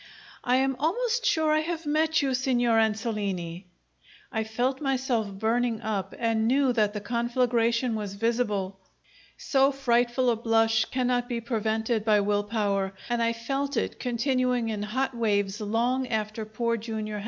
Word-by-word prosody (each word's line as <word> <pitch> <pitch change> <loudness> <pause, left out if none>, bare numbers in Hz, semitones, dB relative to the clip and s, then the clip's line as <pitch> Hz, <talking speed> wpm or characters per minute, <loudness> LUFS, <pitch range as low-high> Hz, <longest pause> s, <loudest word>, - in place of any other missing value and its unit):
"I 250 - +2
am 265 +1 +2
almost 475 - 0
sure 315 -1 +2
I 310 - +4
have 330 +1 -3
met 310 +1 +2
you, 270 -1 +1
Signor 245 -3 +2
Ansolini." 205 -6 -2 0.7
I 220 - -1
felt 245 +5 -1
myself 260 -6 0
burning 225 +3 0
up 205 -3 -3
and 225 -1 +1
knew 265 +1 +3
that 210 -3 +1
the 210 - -3
conflagration 235 +1 +1
was 205 -2 -4
visible. 205 -4 -1 0.6
So 270 0 +2
frightful 245 -1 +2
a - - +1
blush 225 -1 +2
cannot 245 -1 -1
be 240 -1 -1
prevented 220 -1 -1
by 215 -1 +4
will 205 0 +1
power, 200 -3 -1
and 240 -1 0
I 230 0 +2
felt 270 +4 -3
it - - -2
continuing 250 -1 0
in 215 -2 -3
hot 260 +5 -2
waves 205 -3 0
long 240 +5 0
after 215 -1 -2
Poor 230 +2 -1
Jr. 215 -1 -4
235 Hz, 155 wpm, -27 LUFS, 215-255 Hz, 0.7 s, I